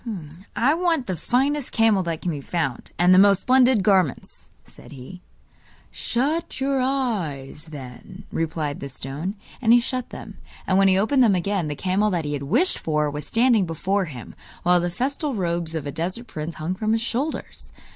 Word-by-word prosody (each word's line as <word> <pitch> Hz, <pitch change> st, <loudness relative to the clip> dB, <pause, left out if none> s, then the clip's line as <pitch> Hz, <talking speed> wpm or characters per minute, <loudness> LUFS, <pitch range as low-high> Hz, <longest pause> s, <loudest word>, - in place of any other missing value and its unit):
'I 270 Hz, +5 st, +3 dB
want 330 Hz, -5 st, +1 dB
the 185 Hz, -, -2 dB
finest 265 Hz, -, 0 dB
camel 225 Hz, -4 st, +3 dB
that 165 Hz, -3 st, -4 dB
can 175 Hz, -, 0 dB
be 145 Hz, -3 st, -5 dB
found, 140 Hz, -5 st, -3 dB
and 180 Hz, +1 st, +5 dB
the 185 Hz, -, +7 dB
most 200 Hz, -1 st, +5 dB
splendid 255 Hz, -4 st, +4 dB
garments,' 185 Hz, -8 st, 0 dB, 0.2 s
said -, -, -13 dB
he. 140 Hz, +7 st, -10 dB, 0.7 s
'Shut 300 Hz, +8 st, -1 dB
your 270 Hz, 0 st, +1 dB
eyes 190 Hz, -, -2 dB
then,' 150 Hz, +5 st, -10 dB
replied 160 Hz, -3 st, -2 dB
the 140 Hz, -, -6 dB
stone. 140 Hz, +9 st, -5 dB, 0.3 s
And 230 Hz, -2 st, +5 dB
he 240 Hz, -, +7 dB
shut 255 Hz, +1 st, -3 dB
them; -, -, -10 dB, 0.3 s
and 190 Hz, 0 st, +2 dB
when 195 Hz, -, +5 dB
he 190 Hz, -1 st, +4 dB
opened 240 Hz, +7 st, +3 dB
them 220 Hz, -6 st, +5 dB
again 185 Hz, -1 st, -1 dB
the 150 Hz, -, -3 dB
camel 190 Hz, +6 st, +1 dB
that 175 Hz, -5 st, -1 dB
he 145 Hz, -, -2 dB
had 145 Hz, -, -3 dB
wished 315 Hz, -, +2 dB
for 150 Hz, -2 st, 0 dB
was 150 Hz, +1 st, -5 dB
standing 230 Hz, -5 st, +3 dB
before 190 Hz, +5 st, -1 dB
him, 130 Hz, -8 st, -9 dB, 0.3 s
while 180 Hz, 0 st, +4 dB
the 175 Hz, +1 st, -1 dB
festal 275 Hz, -, -2 dB
robes 170 Hz, -3 st, -2 dB
of 155 Hz, -3 st, -3 dB
a 145 Hz, -, -3 dB
desert 180 Hz, -, -3 dB
prince 160 Hz, -5 st, -6 dB
hung 155 Hz, +4 st, -3 dB
from 215 Hz, +3 st, -1 dB
his 225 Hz, -, +1 dB
shoulders. 265 Hz, +7 st, -4 dB
185 Hz, 185 wpm, -23 LUFS, 160-240 Hz, 0.7 s, the